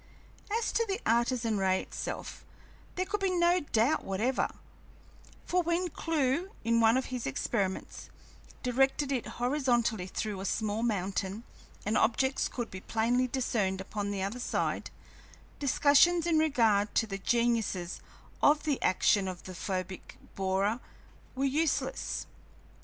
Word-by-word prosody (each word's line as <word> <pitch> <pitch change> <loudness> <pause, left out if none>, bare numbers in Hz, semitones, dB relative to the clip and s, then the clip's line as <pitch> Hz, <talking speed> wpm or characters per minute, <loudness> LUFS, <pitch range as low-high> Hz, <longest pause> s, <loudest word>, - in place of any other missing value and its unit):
As 455 +2 0
to 460 - +2
the 395 +2 -1
Artesian 235 -2 +1
ray 190 -1 +2
itself, - - -6 0.5
there 370 - 0
could 415 +2 -2
be 390 -1 +1
no 350 0 +3
doubt 280 -1 +1
whatever, 215 +7 0 1.0
for 360 0 +2
when 345 +1 0
Clewe, 315 +3 0
in 230 +1 +3
one 225 +2 +5
of 260 - -1
his 250 -2 -3
experiments, 190 - -2 0.5
directed 270 +3 +2
it 255 -4 -1
horizontally 240 -6 +1
through 205 0 -3
a - - -5
small 215 +2 -1
mountain 200 -1 -1 0.4
and 210 +2 0
objects 265 +5 +2
could 240 -2 -5
be 185 - -7
plainly 240 +4 +1
discerned 220 -7 0
upon 200 +1 -4
the 200 -2 -2
other 205 +6 -3
side, - - -1 0.7
discussions 295 +4 +4
in 330 -2 +3
regard 225 -9 +2
to - - +3
the 195 -2 -5
genuineness 225 -6 0 0.4
of 295 +1 +4
the 295 -4 0
action 190 +1 +3
of 185 -1 -6
the 185 - -8
photic 185 0 -5 0.2
borer 195 +4 0 0.6
were 270 +1 0
useless. 310 - 0
235 Hz, 135 wpm, -30 LUFS, 200-285 Hz, 1.0 s, one